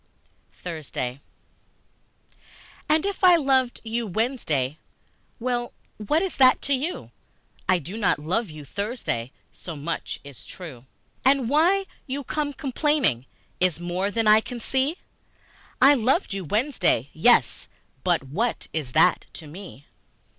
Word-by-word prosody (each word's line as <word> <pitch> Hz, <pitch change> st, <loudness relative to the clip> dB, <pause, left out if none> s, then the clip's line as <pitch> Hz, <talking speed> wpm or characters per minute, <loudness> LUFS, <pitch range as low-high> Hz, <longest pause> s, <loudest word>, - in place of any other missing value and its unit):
Thursday 140 Hz, -6 st, -5 dB, 1.7 s
AND 310 Hz, +3 st, +3 dB
if 400 Hz, -1 st, -3 dB
I 360 Hz, -1 st, +8 dB
loved 265 Hz, -5 st, +2 dB
you 230 Hz, 0 st, -2 dB
Wednesday, 170 Hz, -, -1 dB, 0.6 s
Well, 240 Hz, 0 st, -2 dB, 0.2 s
what 295 Hz, -, +1 dB
is 380 Hz, -, -3 dB
that 255 Hz, -1 st, +6 dB
to 280 Hz, -, +1 dB
you? 300 Hz, +7 st, -3 dB, 0.6 s
I 185 Hz, -, +5 dB
do 175 Hz, +5 st, -7 dB
not 200 Hz, -, +2 dB
love 180 Hz, +9 st, -1 dB
you 155 Hz, -2 st, -10 dB
Thursday 200 Hz, -, -3 dB, 0.2 s
So 170 Hz, -, -8 dB
much 155 Hz, +3 st, -4 dB
is 140 Hz, -3 st, -11 dB
true. 140 Hz, -9 st, -10 dB, 0.4 s
And 265 Hz, -2 st, +3 dB
why 350 Hz, +7 st, +3 dB, 0.2 s
you 280 Hz, +2 st, -3 dB
come 295 Hz, +2 st, -2 dB
complaining 270 Hz, -, 0 dB, 0.3 s
Is 180 Hz, -3 st, +2 dB
more 175 Hz, +3 st, -1 dB
than 225 Hz, +2 st, -1 dB
I 215 Hz, +1 st, +7 dB
can 245 Hz, +1 st, -7 dB
see. 270 Hz, +8 st, 0 dB, 0.8 s
I 275 Hz, +3 st, +8 dB
loved 260 Hz, -, +1 dB
you 195 Hz, -2 st, -4 dB
Wednesday, 235 Hz, -, +1 dB
yes -, -, +3 dB, 0.4 s
but 175 Hz, -5 st, +2 dB
what 200 Hz, -, -2 dB
Is 145 Hz, -6 st, -3 dB
that 180 Hz, -, +4 dB
to 160 Hz, -, -8 dB
me? 155 Hz, -3 st, -11 dB
220 Hz, 130 wpm, -25 LUFS, 165-270 Hz, 1.7 s, I